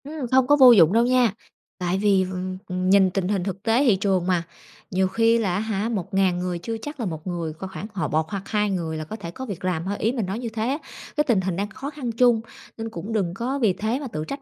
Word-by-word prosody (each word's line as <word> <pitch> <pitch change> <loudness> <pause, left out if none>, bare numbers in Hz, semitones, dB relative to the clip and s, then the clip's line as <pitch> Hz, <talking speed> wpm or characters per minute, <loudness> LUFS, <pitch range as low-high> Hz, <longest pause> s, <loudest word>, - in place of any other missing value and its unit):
Ừm, 290 -2 -5
không 260 -1 +4
có 290 - +6
vô 260 -3 +9
dụng 180 -6 +6
đâu 230 +1 +4
nha, 250 -4 +3 0.4
tại 180 0 -1
vì 195 -1 +3
v 185 - -5
ừm, 185 0 -4
ừm, 185 0 -1
nhìn 195 -1 +6
tình 180 0 -1
hình 195 -2 0
thực 195 +1 -5
tế 230 +5 +3
thị 225 -6 +5
trường 190 -2 0
mà, 180 -2 +1 0.5
nhiều 190 +1 +2
khi 225 +4 +3
là, 205 -6 0
á - - 0
hả, 215 0 -2
1.000 190 -3 0
người 180 -1 -2
chưa 225 +6 -4
chắc 295 +3 -7
là 235 - -2
một 160 -2 -5
người 170 -3 -3
có 180 +5 -7
khoảng 195 - -6
họ 165 -7 -1
một 155 +1 0
hoặc 200 -2 -3
hai 210 -1 +1
người 165 -4 -2
là 155 - -4
có 185 +8 -7
thể 175 -6 -7
có 260 +9 -7
việc 195 -6 -6
làm 175 -2 -1
thôi, 200 +2 -2
ý 225 - +1
mình 240 -5 -2
nói 195 +4 -3
như 240 -2 -4
thế 220 0 -2
á. 275 +3 0 0.4
Cái 300 - +4
tình 235 -10 +2
hình 185 -1 -2
đang 200 +3 -2
khó 270 +7 -6
khăn 275 -5 -4
chung, 235 -1 +3 0.4
nên 225 0 -4
cũng 210 +2 -6
đừng 190 -6 0
có 250 +7 -2
vì 220 -7 +3
thế 220 +7 -2
mà 285 - -5
tự 155 -9 -5
trách 275 0 -5
200 Hz, 285 wpm, -24 LUFS, 185-230 Hz, 0.5 s, vô